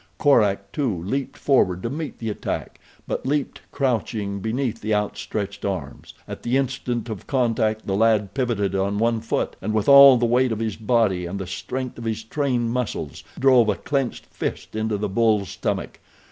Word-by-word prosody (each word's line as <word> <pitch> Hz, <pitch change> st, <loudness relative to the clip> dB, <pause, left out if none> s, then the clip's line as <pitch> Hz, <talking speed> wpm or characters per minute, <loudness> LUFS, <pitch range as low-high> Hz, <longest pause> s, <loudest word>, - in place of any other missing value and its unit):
Korak, 100 Hz, -8 st, +3 dB
too, 110 Hz, -, -1 dB
leaped 135 Hz, +8 st, -3 dB
forward 95 Hz, -10 st, +2 dB
to 115 Hz, -, -1 dB
meet 155 Hz, +1 st, -5 dB
the 115 Hz, -2 st, -3 dB
attack; -, -, -5 dB, 0.3 s
but -, -, -3 dB
leaped 145 Hz, 0 st, -1 dB
crouching, 110 Hz, -6 st, -1 dB
beneath 115 Hz, +2 st, -2 dB
the 110 Hz, 0 st, 0 dB
outstretched 105 Hz, 0 st, -3 dB
arms. 90 Hz, -9 st, -5 dB
At -, -, -7 dB
the 120 Hz, +3 st, +1 dB
instant 125 Hz, -3 st, -2 dB
of 110 Hz, -4 st, -7 dB
contact 110 Hz, -4 st, 0 dB
the 95 Hz, -, -1 dB
lad 105 Hz, -2 st, +2 dB
pivoted 115 Hz, -7 st, 0 dB
on 100 Hz, +1 st, 0 dB
one 115 Hz, +1 st, +1 dB
foot, 115 Hz, -, -2 dB
and 110 Hz, +3 st, -2 dB
with 110 Hz, -, 0 dB
all 140 Hz, -2 st, +10 dB
the 120 Hz, -, +1 dB
weight 125 Hz, +1 st, +2 dB
of 110 Hz, -, -1 dB
his 110 Hz, -2 st, -2 dB
body 105 Hz, -6 st, +1 dB
and 95 Hz, +3 st, -4 dB
the 95 Hz, -, -4 dB
strength 125 Hz, +7 st, -5 dB
of 115 Hz, -, -7 dB
his 110 Hz, 0 st, -2 dB
trained 120 Hz, -2 st, -1 dB
muscles 115 Hz, -, -3 dB
drove 130 Hz, -4 st, +5 dB
a 105 Hz, -, +2 dB
clenched 135 Hz, +7 st, -2 dB
fist -, -, -5 dB
into 110 Hz, -1 st, -1 dB
the 105 Hz, +1 st, -2 dB
bull's 105 Hz, -1 st, +2 dB
stomach. -, -, -3 dB
110 Hz, 180 wpm, -23 LUFS, 100-125 Hz, 0.3 s, all